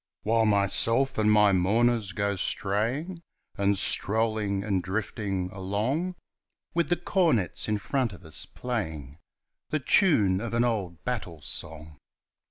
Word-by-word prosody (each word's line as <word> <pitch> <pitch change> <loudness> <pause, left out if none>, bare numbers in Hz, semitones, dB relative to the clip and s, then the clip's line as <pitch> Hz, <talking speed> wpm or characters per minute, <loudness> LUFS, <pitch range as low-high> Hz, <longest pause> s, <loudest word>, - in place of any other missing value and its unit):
While 115 +1 +2
myself 115 +6 +1
and 105 0 +3
my 105 -1 +5
mourners 105 +3 +2
go 100 +2 -1
straying 120 - -1 0.3
And 100 -1 +1
strolling 105 -1 +3
and 100 -3 0
drifting 95 -1 -3
along, 110 - -2 0.6
With 170 0 0
the 175 - +3
cornets 165 - 0
in 105 -1 0
front 125 +2 -1
of 95 -2 -13
us 80 - -3
playing 80 - -5 0.5
The 155 - 0
tune 130 - +3
of 115 0 -4
an 120 - +3
old 100 -8 -2
battle 95 -11 -5
song! 75 -1 -7
105 Hz, 130 wpm, -27 LUFS, 95-120 Hz, 0.6 s, my